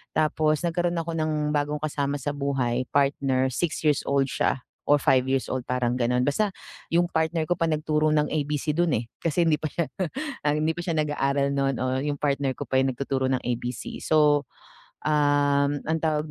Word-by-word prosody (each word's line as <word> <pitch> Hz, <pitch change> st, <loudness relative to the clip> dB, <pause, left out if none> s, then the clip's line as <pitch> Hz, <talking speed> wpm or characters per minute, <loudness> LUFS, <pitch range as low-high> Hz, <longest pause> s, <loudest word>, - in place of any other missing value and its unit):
Tapos 155 Hz, 0 st, +2 dB
nagkaroon 175 Hz, 0 st, 0 dB
ako 165 Hz, 0 st, -3 dB
ng 155 Hz, -1 st, 0 dB
bagong 145 Hz, 0 st, 0 dB
kasama 145 Hz, -1 st, -2 dB
sa 145 Hz, +2 st, -3 dB
buhay, 130 Hz, -3 st, 0 dB
partner 135 Hz, -2 st, +2 dB
six-years-old 140 Hz, -2 st, +1 dB
siya -, -, 0 dB, 0.3 s
or 145 Hz, 0 st, +5 dB
five-years-old 130 Hz, -2 st, +1 dB
parang 125 Hz, -1 st, -1 dB
ganon. 125 Hz, 0 st, +1 dB
Basta, 200 Hz, +8 st, +1 dB, 0.4 s
yung 175 Hz, +1 st, +3 dB
partner 160 Hz, 0 st, 0 dB
ko 175 Hz, -, +1 dB
pa 165 Hz, -, 0 dB
nagturo 155 Hz, 0 st, +1 dB
ng 150 Hz, -1 st, +2 dB
ABC 150 Hz, 0 st, -1 dB
dun, 170 Hz, -3 st, +2 dB
eh. 115 Hz, -, -7 dB
Kasi 165 Hz, +1 st, +1 dB
hindi 155 Hz, -, +4 dB
pa 155 Hz, -, -2 dB
siya 170 Hz, -3 st, -1 dB, 0.6 s
hindi 155 Hz, +2 st, +1 dB
pa 175 Hz, -, -4 dB
siya 170 Hz, -2 st, -1 dB
nag-aaral 140 Hz, -2 st, +1 dB
nun, 135 Hz, -1 st, +1 dB
oo 130 Hz, 0 st, 0 dB
yung 145 Hz, -1 st, -2 dB
partner 140 Hz, -2 st, 0 dB
ko -, -, -5 dB
pa 130 Hz, -, +2 dB
yung 135 Hz, -, +1 dB
nagtuturo 135 Hz, 0 st, -1 dB
ng 130 Hz, -, 0 dB
ABC 120 Hz, 0 st, -4 dB
So, 150 Hz, -2 st, +4 dB, 0.6 s
um, 145 Hz, -1 st, +3 dB, 0.2 s
ang 160 Hz, -, +1 dB
tawag 155 Hz, -1 st, 0 dB
145 Hz, 175 wpm, -25 LUFS, 135-155 Hz, 0.6 s, or